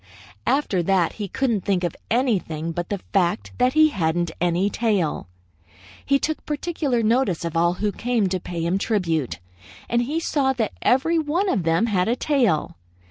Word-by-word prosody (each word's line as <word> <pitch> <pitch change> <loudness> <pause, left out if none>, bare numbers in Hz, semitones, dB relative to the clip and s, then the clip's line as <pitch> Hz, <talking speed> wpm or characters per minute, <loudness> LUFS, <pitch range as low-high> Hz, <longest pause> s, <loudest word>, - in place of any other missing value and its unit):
"After 265 -10 +1
that 180 -1 +1
he 210 -2 -5
couldn't 235 0 0
think 190 -3 0
of 175 - -2
anything 190 - 0
but 175 +1 -4
the 200 -3 -3
fact 190 +1 +1
that 250 +1 +3
he 310 0 +6
hadn't 170 - -1
any 175 +2 +2
tail. 205 - 0 0.8
He 275 - +3
took 315 +2 -3
particular 295 -5 -1
notice 215 -7 +1
of 165 -1 -4
all 170 +1 +2
who 205 +2 -1
came 230 -2 0
to 185 0 -1
pay 170 -1 -4
him 180 +3 +1
tribute, 165 - -1 0.5
and 240 0 +1
he 290 +7 -1
saw 275 -5 +1
that 230 -5 -2
every 325 +6 +3
one 330 +6 0
of 200 - +1
them 165 +5 +2
had 190 -5 +1
a 235 - +2
tail. 245 - +1
205 Hz, 175 wpm, -23 LUFS, 175-260 Hz, 0.8 s, he